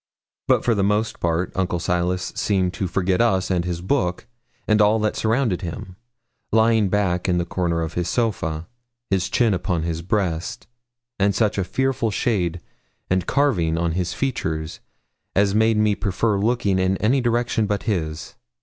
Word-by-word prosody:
But - - +3
for 120 - +3
the 100 - 0
most 105 +2 0
part 85 +1 0
Uncle 90 -2 -1
Silas 90 +1 -1
seemed 95 -3 0
to 95 - -2
forget 95 +2 +1
us 95 -6 +2
and 90 -2 +1
his 85 -1 -3
book, 95 -3 -1 0.4
and 105 -1 +4
all 105 +2 +4
that 110 -1 0
surrounded 110 -4 0
him, 90 +1 -6 0.6
lying 110 -2 +3
back 90 -3 0
in 90 - +2
the 85 - 0
corner 85 -2 -1
of 80 0 -5
his 90 -1 -2
sofa, 85 -9 -1 0.4
his 95 -2 +1
chin 115 -4 +2
upon 90 -2 -1
his 85 -1 -2
breast, 95 +3 -2 0.5
and 100 0 +2
such 105 -2 +1
a - - +1
fearful 130 +4 0
shade 90 -6 -1 0.5
and 95 -1 +1
carving 95 - +1
on 85 0 0
his 90 +1 -1
features 80 -10 -3 0.6
as 100 0 +3
made 110 +1 +3
me 105 -1 +3
prefer 100 +1 0
looking 100 -3 +1
in 95 +1 +1
any 125 +7 +2
direction 120 -2 +1
but 100 0 -1
his. 80 -7 -3
95 Hz, 170 wpm, -22 LUFS, 90-110 Hz, 0.6 s, and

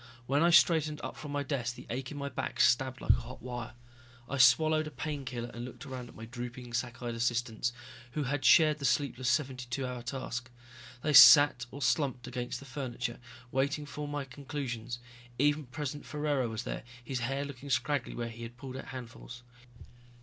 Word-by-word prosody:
When 140 +4 +2
I 170 - +5
straightened 155 -2 +4
up - - -5
from 150 - -8
my 145 0 -1
desk 125 -4 -2
the - - -11
ache 130 +1 -3
in 150 - -7
my 140 0 -3
back 130 -3 -4
stabbed 130 +2 +3
like - - +4
a - - +2
hot 120 +2 -9
wire. 120 -2 -6 0.5
I 140 +1 -3
swallowed 155 +5 +5
a - - -4
painkiller 135 -6 -4
and 120 - -6
looked 125 +2 -8
around 130 -3 -7
at - - -15
my 115 - -8
drooping, 120 0 -7
sack 120 0 -3
eyed 120 -1 -2
assistants 120 0 0 0.4
who 150 - -1
had 140 +1 -2
shared 155 -2 +6
the 140 - -3
sleepless 130 -1 +1
seventy 130 -2 0
two 130 +2 -2
hour 125 -1 -4
task. 125 0 -4 0.5
They 150 - +1
sat 140 -2 +9
or 140 +3 -6
slumped 125 -1 +1
against 125 -1 -4
the 140 - -12
furniture, 125 -2 -4 0.3
waiting 140 +3 0
for 145 +1 -6
my 145 -1 -3
conclusions. 125 -3 -5 0.4
Even 145 +1 +2
President 145 +2 -5
Ferraro 145 -5 0
was 110 +1 -4
there, - - -4 0.2
his 125 +1 -3
hair 135 +4 -1
looking 140 0 -8
scraggly 140 +1 0
where 120 -1 -3
he 115 +1 -10
had 115 +1 -8
pulled 130 +1 -7
out 135 - -7
handfuls. 125 -1 -9
130 Hz, 195 wpm, -31 LUFS, 120-145 Hz, 0.5 s, sat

